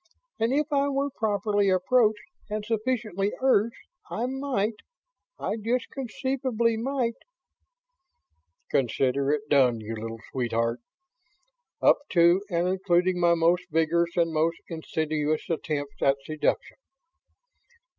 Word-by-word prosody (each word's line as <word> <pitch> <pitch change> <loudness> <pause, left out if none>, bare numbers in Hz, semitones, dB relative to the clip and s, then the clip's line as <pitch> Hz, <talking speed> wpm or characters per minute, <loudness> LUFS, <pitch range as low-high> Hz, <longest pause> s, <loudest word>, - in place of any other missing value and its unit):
and 225 +2 +1
if 295 +3 +2
I 280 0 +3
were 280 0 -1
properly 205 -3 +1
approached 210 +3 +3 0.3
and 210 0 -3
sufficiently 215 -3 -1
urged, 235 -4 +2 0.3
I 235 - -2
might... 255 -5 -1 0.6
I 215 - -2
just 235 +3 -1
conceivably 255 -2 -1
might 240 0 -1 0.8
..." 485 +5 -32
"Consider 135 +2 +1
it 145 -1 -1
done, 130 -5 +4
you 110 +1 -6
little 115 +1 -6
sweetheart! 115 -1 -1 1.0
Up - - +6
to 170 +1 +5
and 175 -1 +1
including 185 -1 +1
my 170 -1 +4
most 170 +2 +2
vigorous 170 +2 +1
and 165 -1 +2
most 160 +2 +1
insidious 155 -2 -2
attempts 150 -3 -3
at 135 0 +3
seduction." 155 0 -1
185 Hz, 115 wpm, -26 LUFS, 155-230 Hz, 1.0 s, Up